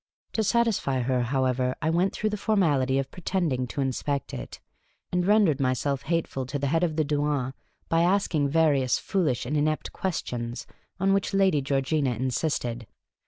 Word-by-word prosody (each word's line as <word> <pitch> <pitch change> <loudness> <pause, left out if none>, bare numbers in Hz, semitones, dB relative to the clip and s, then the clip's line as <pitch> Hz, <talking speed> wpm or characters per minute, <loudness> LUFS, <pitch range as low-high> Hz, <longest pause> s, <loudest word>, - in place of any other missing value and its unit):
To 220 - +1
satisfy 215 - +1
her, 125 0 +1
however, 130 0 0
I 160 0 0
went 180 +3 +2
through 215 0 -2
the - - -1
formality 160 -12 +2
of 135 0 -2
pretending 165 -8 -1
to 140 - -3
inspect 135 +1 -2
it, - - -7 0.5
and 180 0 0
rendered 200 -9 +4
myself 135 +1 0
hateful 155 -6 -2
to 145 - -3
the 140 - -2
head 165 +5 +1
of 160 -3 0
the 155 -1 +1
douane 145 -3 0 0.3
by 165 0 +2
asking 175 -5 +2
various 140 -5 +3
foolish 155 -13 0
and 140 +5 -2
inept 155 +1 0
questions, 120 -10 -3 0.3
on 195 +1 +3
which 195 0 0
lyady 190 -7 +3
Georgina 135 0 0
insisted. 125 -2 -2
145 Hz, 165 wpm, -26 LUFS, 130-175 Hz, 0.5 s, rendered